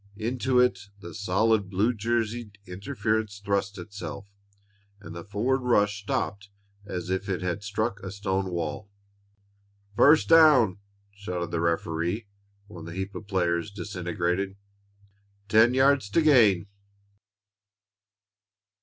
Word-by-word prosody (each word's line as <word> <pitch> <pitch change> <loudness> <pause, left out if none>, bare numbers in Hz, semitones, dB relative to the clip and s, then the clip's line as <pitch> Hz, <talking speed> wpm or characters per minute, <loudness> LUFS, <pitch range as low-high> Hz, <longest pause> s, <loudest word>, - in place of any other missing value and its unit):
Into 125 +3 0
it 105 -5 +1
the 100 - -10
solid 105 +1 +1
blue 105 +6 +1
jerseyed 115 -1 -2
interference 110 +1 -2
thrust 100 0 -2
itself, 100 +1 -7 0.7
and 90 -4 -10
the 85 - -7
forward 110 +7 0
rush 105 -5 +1
stopped 100 0 -3 0.4
as 90 -1 -4
if 95 +2 -2
it 90 -1 -2
had 90 +2 -2
struck 105 +1 -2
a 100 - -7
stone 95 -1 -2
wall. 85 +3 -4 1.1
"First 150 +7 +5
down!" 150 - +6 0.3
shouted 90 -4 -5
the 85 - -1
referee 85 +5 -1 0.4
when 90 -5 -11
the 85 0 -8
heap 95 +1 -4
of 95 +2 -8
players 85 -1 0
disintegrated. 90 -1 -3 0.9
"Ten 110 +4 +5
yards 135 -4 +3
to 165 +10 +2
gain!" 110 - +5
100 Hz, 120 wpm, -26 LUFS, 90-110 Hz, 1.1 s, down